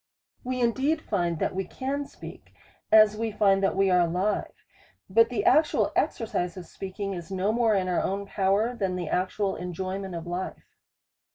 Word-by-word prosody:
We 255 Hz, 0 st, -3 dB
indeed 265 Hz, +7 st, +1 dB
find 175 Hz, -, -1 dB
that -, -, -1 dB
we 190 Hz, +1 st, -1 dB
can 275 Hz, +8 st, -4 dB
speak, -, -, -12 dB, 0.4 s
as 215 Hz, -1 st, +7 dB
we 225 Hz, +1 st, -2 dB
find 200 Hz, -2 st, +3 dB
that 195 Hz, -, +1 dB
we 195 Hz, 0 st, +3 dB
are 180 Hz, -, +5 dB
alive; 180 Hz, +4 st, 0 dB, 0.6 s
but 230 Hz, +3 st, +5 dB
the 250 Hz, +10 st, -2 dB
actual 320 Hz, -4 st, +3 dB
exercise 180 Hz, -6 st, -1 dB
of 180 Hz, -, -7 dB
speaking 195 Hz, +3 st, -5 dB
is 175 Hz, -1 st, -7 dB
no 190 Hz, +2 st, 0 dB
more 225 Hz, -2 st, +2 dB
in 185 Hz, -2 st, 0 dB
our 180 Hz, -, +1 dB
own 200 Hz, +1 st, -2 dB
power, 200 Hz, +5 st, +1 dB
than 195 Hz, -5 st, -1 dB
the 175 Hz, -3 st, -4 dB
actual 190 Hz, +2 st, -1 dB
enjoyment 185 Hz, +1 st, -4 dB
of 165 Hz, 0 st, -6 dB
life. 175 Hz, +2 st, -5 dB
195 Hz, 175 wpm, -27 LUFS, 185-225 Hz, 0.6 s, as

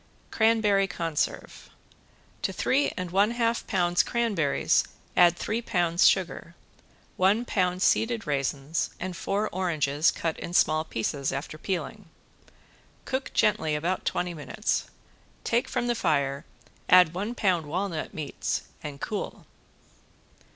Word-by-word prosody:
~CRANBERRY 220 Hz, -3 st, +3 dB
CONSERVE~ 165 Hz, -4 st, -3 dB, 0.7 s
To -, -, -1 dB
three 280 Hz, +2 st, +1 dB
and 180 Hz, -2 st, -4 dB
a 205 Hz, +4 st, +3 dB
half 235 Hz, -1 st, 0 dB
pounds 175 Hz, -4 st, +2 dB
cranberries 210 Hz, -, +1 dB, 0.3 s
add 175 Hz, -1 st, +5 dB
three 225 Hz, +3 st, -2 dB
pounds 175 Hz, -5 st, +3 dB
sugar, 170 Hz, -2 st, 0 dB, 0.6 s
one 200 Hz, +6 st, +3 dB
pound 185 Hz, -4 st, 0 dB
seeded 225 Hz, 0 st, +2 dB
raisins 140 Hz, +2 st, -1 dB
and 185 Hz, 0 st, -4 dB
four 200 Hz, +4 st, -1 dB
oranges, 160 Hz, -4 st, +1 dB
cut 165 Hz, -1 st, -2 dB
in 175 Hz, -, -5 dB
small 155 Hz, -2 st, +3 dB
pieces 140 Hz, 0 st, -2 dB
after 140 Hz, +3 st, -5 dB
peeling. 190 Hz, +2 st, -4 dB, 1.0 s
Cook 260 Hz, 0 st, -2 dB
gently 160 Hz, -8 st, +2 dB
about 170 Hz, +5 st, -1 dB
twenty 175 Hz, -1 st, -1 dB
minutes, 150 Hz, -3 st, -2 dB, 0.6 s
take 235 Hz, +1 st, +1 dB
from 250 Hz, -1 st, -1 dB
the 240 Hz, -, +1 dB
fire, 140 Hz, -7 st, 0 dB, 0.4 s
add 180 Hz, -3 st, +7 dB
one 205 Hz, +7 st, -3 dB
pound 180 Hz, -9 st, +1 dB
walnut 175 Hz, 0 st, -3 dB
meats, 155 Hz, -2 st, -3 dB, 0.2 s
and 145 Hz, -2 st, -7 dB
cool. 215 Hz, +6 st, -5 dB
180 Hz, 125 wpm, -27 LUFS, 155-210 Hz, 1.0 s, add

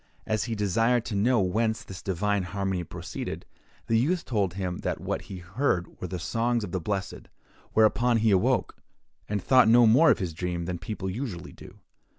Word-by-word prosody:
As 110 Hz, -1 st, 0 dB
he 115 Hz, -2 st, -3 dB
desired 115 Hz, +4 st, +1 dB
to 105 Hz, -, -4 dB
know 120 Hz, +4 st, +3 dB
whence 110 Hz, +4 st, 0 dB
this 95 Hz, -1 st, -9 dB
divine 100 Hz, +2 st, 0 dB
harmony 95 Hz, -1 st, -2 dB
proceeded, -, -, -6 dB, 0.4 s
the 115 Hz, 0 st, +2 dB
youth 170 Hz, +8 st, 0 dB
told 100 Hz, -7 st, -1 dB
him 90 Hz, -2 st, -3 dB
that -, -, -3 dB
what -, -, -3 dB
he 95 Hz, -, -6 dB
heard 90 Hz, 0 st, -2 dB
were 90 Hz, -, -3 dB
the 90 Hz, -, -4 dB
songs 115 Hz, +6 st, 0 dB
of 90 Hz, -, -6 dB
the 95 Hz, -, -1 dB
blessed; 100 Hz, +2 st, -4 dB, 0.5 s
whereupon 120 Hz, +2 st, +3 dB
he 110 Hz, -1 st, +3 dB
awoke, 95 Hz, -2 st, +2 dB, 0.5 s
and 100 Hz, -3 st, -2 dB
thought 130 Hz, -3 st, +5 dB
no 120 Hz, +1 st, +7 dB
more 130 Hz, +9 st, +6 dB
of -, -, +5 dB
his 90 Hz, -4 st, -3 dB
dream 85 Hz, 0 st, -3 dB
than 90 Hz, -1 st, -4 dB
people 95 Hz, +1 st, -5 dB
usually 95 Hz, -, -5 dB
do. -, -, -14 dB
105 Hz, 185 wpm, -27 LUFS, 90-115 Hz, 0.5 s, no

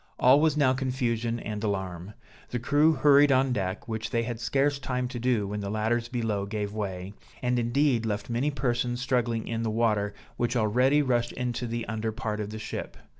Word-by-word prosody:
All 130 Hz, +4 st, +6 dB
was 155 Hz, -2 st, +2 dB
now 135 Hz, -3 st, +4 dB
confusion 120 Hz, -3 st, -1 dB
and 105 Hz, -1 st, -5 dB
alarm; 95 Hz, -1 st, -3 dB, 0.3 s
the 125 Hz, -, -2 dB
crew 145 Hz, +6 st, +3 dB
hurried 145 Hz, 0 st, +5 dB
on 130 Hz, -1 st, +3 dB
deck, 95 Hz, -2 st, -3 dB
which 110 Hz, -1 st, -3 dB
they 115 Hz, -2 st, 0 dB
had 115 Hz, -1 st, -4 dB
scarce 140 Hz, +3 st, +1 dB
time 125 Hz, -1 st, -2 dB
to 125 Hz, -, -5 dB
do 120 Hz, -4 st, +1 dB
when 105 Hz, +1 st, -3 dB
the 100 Hz, -1 st, -4 dB
ladders 110 Hz, +3 st, 0 dB
below 110 Hz, -5 st, -2 dB
gave 105 Hz, 0 st, -3 dB
way, 95 Hz, -2 st, -4 dB, 0.3 s
and 125 Hz, 0 st, +1 dB
indeed 120 Hz, 0 st, +2 dB
left 105 Hz, -2 st, -2 dB
many 120 Hz, +5 st, 0 dB
persons 120 Hz, -3 st, -1 dB
struggling 120 Hz, -3 st, 0 dB
in 115 Hz, 0 st, -2 dB
the 115 Hz, -, -1 dB
water, 105 Hz, -2 st, +1 dB, 0.2 s
which 120 Hz, +1 st, 0 dB
already 125 Hz, +6 st, +3 dB
rushed 120 Hz, -3 st, 0 dB
into 125 Hz, -1 st, -3 dB
the 115 Hz, 0 st, -3 dB
under 110 Hz, 0 st, -2 dB
part 110 Hz, -2 st, -3 dB
of 105 Hz, -1 st, -3 dB
the 110 Hz, -, -6 dB
ship. 110 Hz, -, -6 dB
120 Hz, 195 wpm, -27 LUFS, 110-130 Hz, 0.3 s, All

